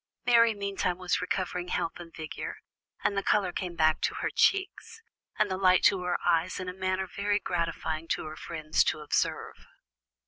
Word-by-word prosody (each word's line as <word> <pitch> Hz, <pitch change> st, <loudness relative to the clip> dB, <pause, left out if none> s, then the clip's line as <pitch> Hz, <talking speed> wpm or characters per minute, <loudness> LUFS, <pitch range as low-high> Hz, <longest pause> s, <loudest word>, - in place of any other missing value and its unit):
Mary 230 Hz, -2 st, +5 dB
meantime 200 Hz, -3 st, -2 dB
was 185 Hz, -1 st, -1 dB
recovering 180 Hz, -1 st, -2 dB
health 165 Hz, -1 st, -2 dB
and 170 Hz, -1 st, -10 dB
vigour, 155 Hz, -1 st, -6 dB, 0.5 s
and 200 Hz, -, +1 dB
the 200 Hz, -, +1 dB
colour 195 Hz, -2 st, +2 dB
came 180 Hz, -1 st, -4 dB
back 155 Hz, -1 st, +3 dB
to -, -, 0 dB
her -, -, -2 dB
cheeks, 395 Hz, +3 st, +1 dB, 0.4 s
and 215 Hz, -2 st, +2 dB
the 185 Hz, -, -2 dB
light 185 Hz, -1 st, +4 dB
to 195 Hz, -3 st, +4 dB
her 180 Hz, 0 st, 0 dB
eyes 170 Hz, +2 st, +2 dB
in 185 Hz, -, -5 dB
a 180 Hz, -, -4 dB
manner 185 Hz, 0 st, -1 dB
very 205 Hz, +2 st, -1 dB
gratifying 165 Hz, -3 st, -2 dB
to -, -, -1 dB
her 155 Hz, 0 st, -7 dB
friends 155 Hz, -2 st, 0 dB
to 155 Hz, -, -1 dB
observe. 150 Hz, -, -2 dB
180 Hz, 180 wpm, -29 LUFS, 165-200 Hz, 0.5 s, Mary